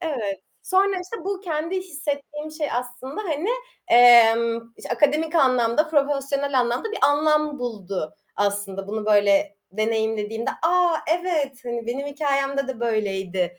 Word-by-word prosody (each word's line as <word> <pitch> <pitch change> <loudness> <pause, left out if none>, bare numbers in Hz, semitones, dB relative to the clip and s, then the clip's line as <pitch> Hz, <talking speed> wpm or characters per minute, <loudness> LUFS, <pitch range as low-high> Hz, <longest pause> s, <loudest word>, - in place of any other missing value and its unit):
Evet. 230 - -3 0.2
Sonra, 385 +1 +2
işte, 370 +1 -8
bu 390 -1 -3
kendi 335 0 -2
hissettiğim 295 -3 -5
şey 310 -1 -3
aslında 250 - -5
hani, 335 0 -2 0.4
emm, 230 -1 +6
işte, - - -10
akademik 300 +6 +1
anlamda, 255 0 +3
profesyonel 280 -2 0
anlamda 245 - -2
bir - - -3
anlam 300 0 +2
buldu 200 -9 -5 0.2
aslında 200 -1 -2
bunu 215 0 -4
böyle 205 -1 +3 0.2
deneyimlediğimde. 220 +1 -1
"A, 350 +1 +3 0.3
evet, 300 -8 -2
hani, 235 -1 -4
benim 270 +4 -3
hikâyemde 275 -1 -1
de 255 -3 -5
böyleydi" 190 -6 -1
265 Hz, 130 wpm, -23 LUFS, 225-305 Hz, 0.4 s, emm